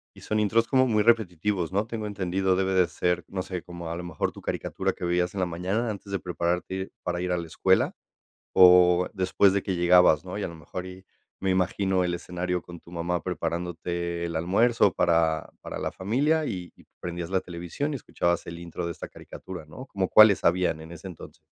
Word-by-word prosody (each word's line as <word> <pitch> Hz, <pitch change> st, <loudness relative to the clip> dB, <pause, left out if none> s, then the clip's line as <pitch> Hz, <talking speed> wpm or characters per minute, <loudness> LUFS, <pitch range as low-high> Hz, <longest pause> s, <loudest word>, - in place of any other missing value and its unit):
Y -, -, -14 dB
son 110 Hz, 0 st, -1 dB
intros 115 Hz, +2 st, +2 dB
como 130 Hz, -1 st, +3 dB
muy 105 Hz, -2 st, +2 dB
repetitivos, 100 Hz, -5 st, +1 dB
¿no? 100 Hz, +3 st, +1 dB
Tengo 110 Hz, -2 st, -5 dB
entendido, 95 Hz, -1 st, 0 dB
debe 95 Hz, 0 st, 0 dB
de 90 Hz, -2 st, +4 dB
ser, 90 Hz, 0 st, -1 dB
no 95 Hz, -1 st, -4 dB
sé, 90 Hz, -2 st, -5 dB
como 85 Hz, -2 st, -8 dB
a -, -, -3 dB
lo 90 Hz, -, -6 dB
mejor 85 Hz, -4 st, -2 dB
tu -, -, -12 dB
caricatura -, -, -2 dB
que 90 Hz, -, -6 dB
vivías 90 Hz, +1 st, 0 dB
en 95 Hz, -, -2 dB
la 95 Hz, -, +2 dB
mañana 95 Hz, +7 st, -2 dB
antes 100 Hz, -1 st, -7 dB
de 100 Hz, -, -1 dB
prepararte 90 Hz, 0 st, -2 dB
ir 95 Hz, 0 st, -4 dB
para 90 Hz, 0 st, -2 dB
ir 90 Hz, 0 st, -2 dB
a 90 Hz, -, +1 dB
la 85 Hz, -, -4 dB
escuela 80 Hz, -, +2 dB, 0.6 s
o 90 Hz, -1 st, +7 dB
después 95 Hz, +1 st, +3 dB
de 100 Hz, -, +1 dB
que 95 Hz, -, -2 dB
llegabas, 90 Hz, -2 st, +5 dB
¿no? 95 Hz, +2 st, -6 dB
Y 105 Hz, -, -3 dB
a -, -, -1 dB
lo 85 Hz, -, -9 dB
mejor 85 Hz, +4 st, -7 dB
y 95 Hz, +1 st, -11 dB, 0.4 s
me 95 Hz, -, 0 dB
imagino 95 Hz, 0 st, +1 dB
el 90 Hz, -1 st, -1 dB
escenario 90 Hz, 0 st, -3 dB
con 85 Hz, +1 st, -11 dB
tu 85 Hz, -, -17 dB
mamá 85 Hz, 0 st, -2 dB
preparándote 85 Hz, 0 st, -3 dB
el 85 Hz, -1 st, -4 dB
almuerzo 100 Hz, +5 st, +3 dB
para 80 Hz, -2 st, +2 dB
para -, -, -6 dB
la -, -, -2 dB
familia 145 Hz, +11 st, +1 dB
y 90 Hz, -8 st, -5 dB
y -, -, -20 dB
prendías 85 Hz, 0 st, -5 dB
la 95 Hz, -, +2 dB
televisión 90 Hz, -, -4 dB
y -, -, -2 dB
escuchabas 85 Hz, -8 st, -1 dB
el 85 Hz, 0 st, -7 dB
intro 85 Hz, 0 st, -5 dB
de 85 Hz, -, -2 dB
esta -, -, -8 dB
caricatura, 95 Hz, -4 st, -10 dB
¿no? 130 Hz, -, -10 dB
¿Cómo 95 Hz, -2 st, -1 dB
cuáles 105 Hz, -3 st, +7 dB
habían 85 Hz, -2 st, +2 dB
en 80 Hz, -, -11 dB
ese 85 Hz, +3 st, -9 dB
entonces? 90 Hz, -4 st, -11 dB
90 Hz, 220 wpm, -26 LUFS, 85-95 Hz, 0.6 s, o